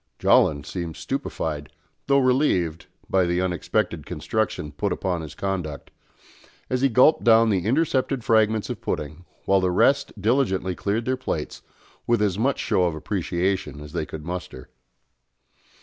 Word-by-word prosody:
Jolland 70 -2 +3
seemed 85 -1 -5
stupefied, 75 -2 -4 0.4
though 140 - +4
relieved, 125 - +1 0.2
by 95 -2 +2
the 85 +1 0
unexpected 90 -1 -1
construction 75 +1 -2
put 100 +7 -2
upon 90 -1 -2
his 80 - -9
conduct, 90 -7 -4 0.8
as 125 0 0
he 135 - +4
gulped 130 +6 +4
down 115 -1 +5
the 95 -3 0
intercepted 135 -2 +1
fragments 110 -1 +2
of - - -6
pudding, 75 +4 -4 0.2
while 95 -1 +3
the 90 - +1
rest 140 +6 +2
diligently 100 -5 +1
cleared 105 +5 -2
their 130 0 0
plates 80 -11 -4 0.5
with 120 -1 +3
as 105 -2 0
much 135 +4 +1
show 90 - +1
of 85 -3 -1
appreciation 90 -2 -2
as 75 +1 -10
they 80 -3 -2
could 75 -1 -8
muster. 85 -7 -6
95 Hz, 150 wpm, -24 LUFS, 85-115 Hz, 0.8 s, down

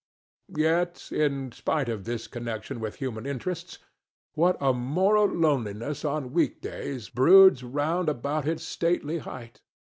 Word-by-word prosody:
Yet, 170 +3 0
in 140 -4 0
spite 145 +3 -1
of 110 -5 -4
this 115 0 -4
connection 120 +1 -6
with 110 -1 -4
human 125 -2 -5
interests, 145 +6 -5 0.6
what 175 +4 +2
a 135 -2 +2
moral 185 +12 +2
loneliness 140 - -1
on 145 -4 -2
week 170 - +1
days 130 -7 -6
broods 175 - +7
round 150 +7 -1
about 145 +2 -2
its 160 0 -1
stately 170 -1 -1
height! 120 -5 -10
140 Hz, 130 wpm, -27 LUFS, 120-165 Hz, 0.6 s, broods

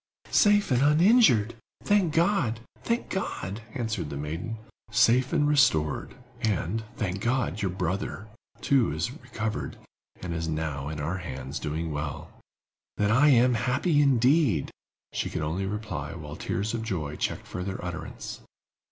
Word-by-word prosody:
"Safe 205 -5 +4
and 125 0 +3
uninjured! 150 - +5 0.3
Thank 205 -5 +3
God—thank 165 - 0
God!" 110 - -3
answered 110 - -2
the 70 - -5
maiden. 80 +10 -4 0.3
"Safe 120 +3 +4
and 150 -3 +2
restored; 115 - +2 0.3
and, 110 -1 0
thank 95 -3 -2
God, 120 -3 0
your 95 - 0
brother, 95 +3 -3 0.4
too, 135 -4 +3
is 80 +10 -2
recovered, 110 -7 -4 0.5
and 90 -2 -3
is 80 0 -2
now 75 -3 -2
in 75 -1 -5
our 85 +6 -2
hands, 70 -4 -5
doing 80 +2 -3
well!" 75 -1 -4 0.7
"Then 105 0 +2
I 140 +6 +5
am 125 -1 +5
happy, 130 +7 +2
indeed!" 130 - +3 0.4
she - - -1
could 80 - -3
only 90 +6 -2
reply, 95 -8 -4
while 75 -3 -7
tears 100 +7 -2
of 115 - -2
joy 85 -10 -3
checked - - -3
further 95 +1 -4
utterance. 85 0 -6
110 Hz, 140 wpm, -27 LUFS, 80-130 Hz, 0.7 s, uninjured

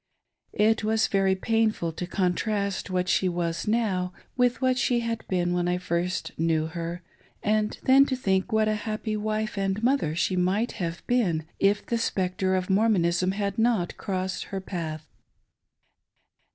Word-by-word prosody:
It 220 +1 +3
was 220 +1 +2
verj 195 -1 +1
painful 225 -7 +1
to 175 +2 -5
contrast 200 +2 -1
what 180 0 0
she 185 - +2
now 180 - -1 0.3
was 195 -5 0 0.2
with 245 -1 +2
what 255 -1 +2
she 245 -2 +2
had 230 -1 -3
been 175 -1 0
when 175 0 0
I 180 0 +1
first 180 0 -2
knew 160 -1 +2
her, 170 +2 -5 0.4
and 210 0 +1
then 270 +2 +6
to 260 - 0
think 190 -4 0
what 220 0 +3
a 215 - +2 0.2
happy 215 0 -2
wife 215 0 -2
and 195 +2 -1
mother 245 - +2
she 185 +2 +1
might 190 +6 +1
have 170 0 -4
been 185 -11 +1
if 200 +1 +2
the 235 - -1
spectre 185 -3 0
of 185 -1 -1
Mormonism 190 -3 +2
had 200 0 -2
not 225 -6 +1
crossed 185 -1 -3
her 195 - -4
path. 160 -5 -5
195 Hz, 160 wpm, -26 LUFS, 180-220 Hz, 0.4 s, then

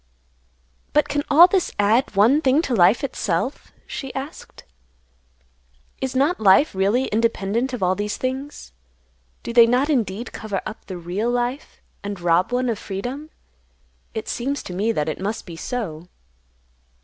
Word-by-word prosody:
"But 300 - +3
can 290 0 -1
all 315 +4 +9
this 370 0 +1
add 215 +3 +2
one 235 +10 +5
thing 275 +3 +3
to 260 - -2
life 205 +4 +4
itself?" 250 - -2
she 270 -2 -6
asked. 270 +3 -8 1.4
"Is 265 -1 -3
not 285 +7 +2
life 215 +9 +5
really 200 +7 +1
independent 230 +2 0
of 250 -6 -3
all 180 0 +3
these 205 +2 -3
things? 265 - -5 0.7
Do 235 - -5
they 235 -1 +7
not 255 +6 +2
indeed 225 -3 -1
cover 205 -3 -4
up 215 - -8
the 185 - -6
real 180 +7 -2
life, 245 +3 -3 0.2
and 200 -1 -5
rob 175 +4 +2
one 250 +1 0
of 225 -3 -1
freedom? 245 +10 -5 0.9
It 220 0 -4
seems 275 +4 -2
to 180 - -7
me 205 +5 0
that 150 -9 -1
it 155 - -3
must 210 +3 -3
be 170 -4 -9
so." 175 -5 -5
230 Hz, 155 wpm, -22 LUFS, 195-265 Hz, 1.4 s, all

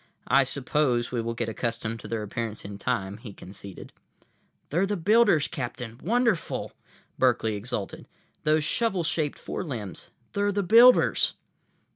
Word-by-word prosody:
"I 140 0 +5
suppose 130 -2 0
we 120 -2 -1
will 115 +1 -3
get 115 0 -2
accustomed 115 0 -3
to - - -9
their 115 -2 -3
appearance 110 +1 -5
in 100 0 -7
time," 100 -4 -2
he 110 -2 -10
conceded. 95 +1 -11 0.8
"They're 175 +6 +2
the 205 0 -1
builders, 200 -3 +4
Captain. 120 -5 -6
Wonderful!" 225 -1 0 0.5
Berkeley 120 -4 +2
exulted. 105 -1 -5 0.4
"Those 155 0 +3
shovel 195 +2 +1
shaped 155 -2 -1
forelimbs—they're 150 - -4
the 200 0 0
builders!" 235 +6 +6
125 Hz, 130 wpm, -27 LUFS, 115-175 Hz, 0.8 s, builders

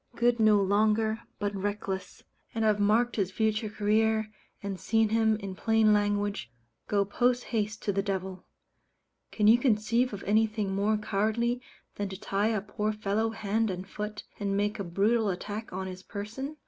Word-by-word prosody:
good 240 0 +2
no 215 -2 +5
longer, 215 +3 +2 0.2
but 205 0 -2
reckless. 195 -1 -4 0.3
And 225 -1 +1
I've 210 -1 +3
marked 225 +4 +2
his 195 -3 +1
future 215 +2 0
career, 220 +1 +1 0.3
and 195 -2 -4
seen 225 +4 +2
him, 220 0 +3
in 200 -3 -6
plain 220 +1 +3
language, 205 - 0 0.4
go 200 -1 +2
posthaste 225 -1 0
to 205 - +1
the 195 - +1
devil. 190 -2 -4 0.8
Can 210 - 0
you 225 +3 +7
conceive 235 0 +2
of 200 -2 -7
anything 215 -1 +1
more 205 +2 +1
cowardly 220 +4 0 0.4
than 205 -1 -2
to 190 0 -7
tie 205 0 0
a 215 -3 0
poor 210 +1 -2
fellow 215 +1 0
hand 220 0 -1
and 185 0 -5
foot, 210 +1 -5 0.2
and 200 -1 -1
make 205 +1 0
a - - -1
brutal 205 +5 +1
attack 205 +4 -5
on 190 +1 -4
his 185 0 -7
person? 225 +10 -6
210 Hz, 165 wpm, -29 LUFS, 200-220 Hz, 0.8 s, you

